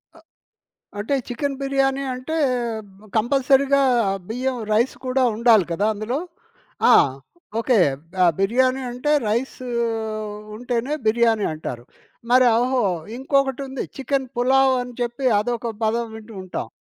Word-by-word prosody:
అ - - -16 0.8
అంటే 225 +7 -1
చికెన్ 275 +3 -2
బిర్యానీ 275 0 +1
అంటే 265 +6 -4 0.8
కంపల్సరీగా 275 +4 +3 0.5
బియ్యం 255 +2 -2
రైస్ 230 +5 +2
కూడా 260 +1 +1
ఉండాలి 225 -5 +5
కదా! 200 +5 0
అందులో? 215 +6 -3 0.7
ఆ! - - +8 0.7
ఓకే. 235 -1 +2 0.5
ఆహ్, 170 - +5
బిర్యానీ 255 +6 +2
అంటే 250 +5 -1 0.2
రైస్ 235 +5 -1 1.0
ఉంటేనే 245 +3 -2
బిర్యానీ 225 -1 +3
అంటారు. 125 -6 -6 0.5
మరి 255 0 +6
ఒహో! 255 0 +1 0.3
ఇంకొకటుంది, 270 0 -1
చికెన్ 270 -1 -1
పులావ్ 265 +2 +4
అని 245 0 -9
చెప్పి 240 +3 -2
అదొక 235 0 -2
పదం 230 +2 0
వింటూ 220 0 -11
ఉంటాం. 175 -10 -5
250 Hz, 115 wpm, -22 LUFS, 230-270 Hz, 1.0 s, ఆ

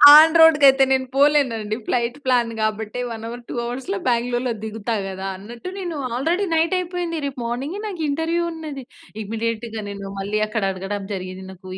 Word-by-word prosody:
On 315 +2 +8
రోడ్‌కి 320 -3 +7
అయితే 270 0 +6
నేను 260 0 +3
పోలేను 285 -2 +4
అండి. 215 0 -3
ఫ్లైట్ 240 +2 0
ప్లాన్ 245 -3 +2
కాబట్టే 215 +2 -2
1:00 225 -1 -6
అవర్ 240 +1 -7
2:00 - - -5
అవర్స్‌లో 260 +11 -3
బాంగ్లోర్‌లో 245 +1 +1
దిగుతా 220 +1 -3
కదా! 190 0 -5
అన్నట్టు 235 - -8
నేను 355 -4 -4 0.2
ఆల్రెడీ 335 +10 +1
నైట్ 330 +3 +2
అయిపోయింది. 350 -2 -3
రేపు 275 -2 -4
మార్నింగే 270 +11 -3
నాకు 370 -5 -5
ఇంటర్వ్యూ 325 +4 0
ఉన్నది. 305 -4 -7 0.4
ఇమ్మీడియేట్‌గా 225 +1 -3
నేను 200 -1 -6
మళ్ళీ 200 +2 -1
అక్కడ 215 0 -2
అడగడం 195 +2 -4
జరిగింది. 185 0 -6
నాకు 185 0 -11
245 Hz, 170 wpm, -22 LUFS, 215-305 Hz, 0.4 s, On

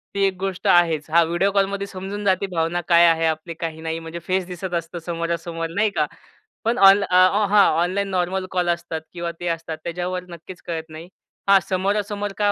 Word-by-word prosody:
ती 200 - +1
एक 195 -1 0
गोष्ट 195 +1 -3
आहेच. 165 -4 +3
हां, 170 +1 +5
व्हिडिओ 175 +4 +1
कॉलमध्ये 200 0 0
समजून 195 +2 -6
जाते 190 0 +2
भावना 175 -1 -1
काय 170 -1 +6
आहे 165 0 +3
आपली 160 +1 -2
काही 160 -1 -6
नाही. 160 0 -3
म्हणजे 165 +1 -7
फेस 185 0 0
दिसत 180 0 -6
असतं 170 0 -3
समोरासमोर 170 -1 -3
नाही 210 +1 +2
का. 150 - +2 0.6
पण 230 +2 0
ऑन 200 +1 +6
अ, 180 - -1 0.3
हां, 205 0 +6 0.2
ऑनलाईन 190 +3 0
नॉर्मल 185 0 -1
कॉल 180 -2 0
असतात 170 -2 -2
किंवा 170 -1 -4
ते 175 - -4
असतात 165 -1 -3
त्याच्यावर 180 +1 -3
नक्कीच 170 +1 -11
कळत 165 -1 -4
नाही. 160 +2 -10 0.4
हां 195 0 +7
समोरासमोर 205 +2 -1
काय 205 -1 +2
175 Hz, 190 wpm, -22 LUFS, 165-195 Hz, 0.6 s, हां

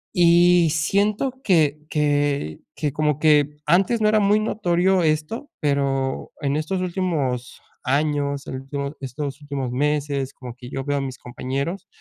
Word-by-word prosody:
Y 175 -1 +5
siento 200 - +1
que 155 -6 +3
que 145 - 0 0.2
que 150 -3 -1
como 150 -1 0
que 150 -1 +3
antes 195 +7 +3
no 210 - +4
era 215 - +4
muy 205 +1 +3
notorio 185 -4 +1
esto, 155 - -1
pero 135 -2 -1
en 140 0 0
estos 160 +5 -1
últimos 160 -9 -2 0.2
años, 140 0 0
el - - -5
último 140 +2 -5
estos 135 +1 -5
últimos 140 -4 -4
meses, 140 0 -1
como 125 -2 -9
que 125 -1 -11
yo 135 - -3
veo 145 +1 -1
a 140 - -1
mis 130 -2 -5
compañeros, 135 +9 -4
150 Hz, 150 wpm, -22 LUFS, 140-175 Hz, 0.2 s, Y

